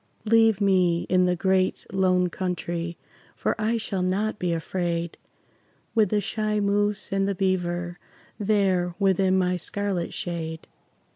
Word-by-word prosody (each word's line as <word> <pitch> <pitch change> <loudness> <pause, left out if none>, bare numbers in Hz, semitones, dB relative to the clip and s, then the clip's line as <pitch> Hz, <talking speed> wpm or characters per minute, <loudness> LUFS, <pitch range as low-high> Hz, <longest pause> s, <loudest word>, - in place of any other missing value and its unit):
Leave 225 -1 +4
me 185 -4 +3
in 185 0 +4
the 180 - +2
Great 190 +1 +1
Lone 185 -1 +3
Country, 175 -1 -3 0.4
For - - 0
I 225 +2 +1
shall 200 -4 -3
not 205 +4 -1
be 180 -1 0
afraid 170 0 -2 0.8
With 220 -4 +3
the 210 - +2
shy 215 +1 -1
moose 205 +1 0
and 195 0 +1
the 200 - -1
beaver 175 -2 -1 0.4
There 195 -4 +1
within 190 -1 +3
my 180 -1 +1
scarlet 195 -1 -2
shade. 160 -2 -4
185 Hz, 135 wpm, -25 LUFS, 175-205 Hz, 0.8 s, Leave